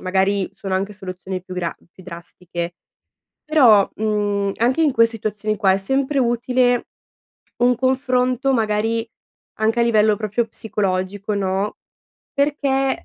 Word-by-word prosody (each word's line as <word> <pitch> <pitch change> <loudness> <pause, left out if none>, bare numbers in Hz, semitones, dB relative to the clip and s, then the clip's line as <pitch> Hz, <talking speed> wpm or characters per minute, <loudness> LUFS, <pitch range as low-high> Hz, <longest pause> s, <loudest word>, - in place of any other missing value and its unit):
magari 190 +1 +1
sono 190 -1 -4
anche 195 +2 -1
soluzioni 185 -1 -6
più 185 - -9
gra 175 -2 -3 0.2
più 185 - -16
drastiche, 175 0 -7 0.7
però, 245 -10 +5
mhmm, 205 -2 0
anche 255 +7 +2
in 295 -4 +3
quei 230 -2 +5
situazioni 215 -1 -3
qua 195 -3 +3
è - - +2
sempre 270 +7 0
utile 245 0 +1 0.7
un 245 +1 +3
confronto, 255 +1 +1
magari, 225 0 0 0.5
anche 220 +2 +1
a - - +5
livello 215 -2 +3
proprio 215 +2 -1
psicologico, 200 -2 -2
no? 195 0 -1 0.6
Perché, 280 -2 0
215 Hz, 130 wpm, -20 LUFS, 195-250 Hz, 0.7 s, però